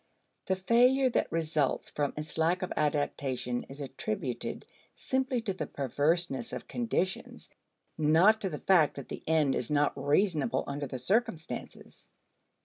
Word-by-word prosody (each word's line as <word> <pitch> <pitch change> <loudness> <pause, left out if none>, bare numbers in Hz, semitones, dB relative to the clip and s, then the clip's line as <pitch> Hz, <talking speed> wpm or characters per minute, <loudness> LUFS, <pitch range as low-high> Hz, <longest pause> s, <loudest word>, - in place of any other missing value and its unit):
The 190 - +2
failure 250 +7 +4
that - - 0
results 155 -4 0
from 145 -2 -1
its 150 +1 -4
lack 175 +4 +2
of 185 - -3
adaptation 140 -4 -1
is 135 +2 -9
attributed 130 -2 -4 0.3
simply 260 -1 -1
to 215 -4 -2
the 155 -6 -4
perverseness 145 - -1
of - - -6
conditions, 225 -6 -2 0.5
not 170 +9 +5
to 195 - -1
the 150 - -4
fact 165 -5 +3
that 140 - -8
the - - -7
end 155 -4 +3
is 120 - -1
not 145 -1 +2
reasonable 155 +8 +1
under 140 0 -4
the 130 - -5
circumstances. 190 - -3
160 Hz, 140 wpm, -30 LUFS, 145-195 Hz, 0.5 s, not